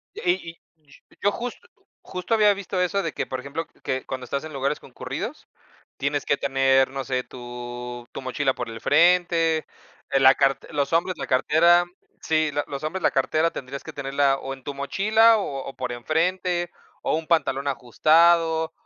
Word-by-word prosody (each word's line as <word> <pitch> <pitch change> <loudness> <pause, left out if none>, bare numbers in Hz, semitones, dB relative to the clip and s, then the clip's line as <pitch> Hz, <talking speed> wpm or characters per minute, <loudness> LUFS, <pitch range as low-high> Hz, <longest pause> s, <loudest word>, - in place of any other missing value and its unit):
Y 175 - +1 0.2
y 170 - -13 0.5
y - - -23
yo 205 - +3
justo 245 - -6 0.4
justo 185 +4 -4
había 210 -2 +5
visto 195 -2 -3
eso 195 +2 0
de 165 - -3
que, - - -3
por 130 - -4
ejemplo, 140 +5 -5 0.2
que, 130 0 -2
cuando 130 -1 -5
estás 140 +4 -3
en 155 - -8
lugares 140 +2 -1
concurridos, - - -7 0.5
tienes 140 +1 -2
que 140 - +2
tener, 135 -1 +2
no 135 0 -4
sé, 130 -1 -1
tu, 120 0 -8
tu - - -6
mochila 130 +1 0
por - - -5
el 115 0 -8
frente, 170 -2 +3 0.4
la 135 -1 +6
carte 135 0 +1
los 145 +1 -1
hombres, 170 +2 +1
la - - -4
cartera. 170 +6 +4 0.4
Sí, 155 -1 +1
lo 145 +1 0
los 140 +1 -6
hombres, 180 +4 -3
la - - +4
cartera 155 +4 +1
tendrías 135 -1 -7
que - - -9
tenerla 140 0 +1
o 135 - -6
en 135 - -16
tu 140 - -6
mochila 215 +10 +4
o 140 -9 -4
o 135 - -8
por 130 -1 -4
enfrente, 175 +7 -1 0.3
o - - +1
un 160 0 -4
pantalón 145 -4 +1
ajustado, 160 +5 +3
145 Hz, 180 wpm, -24 LUFS, 135-170 Hz, 0.5 s, la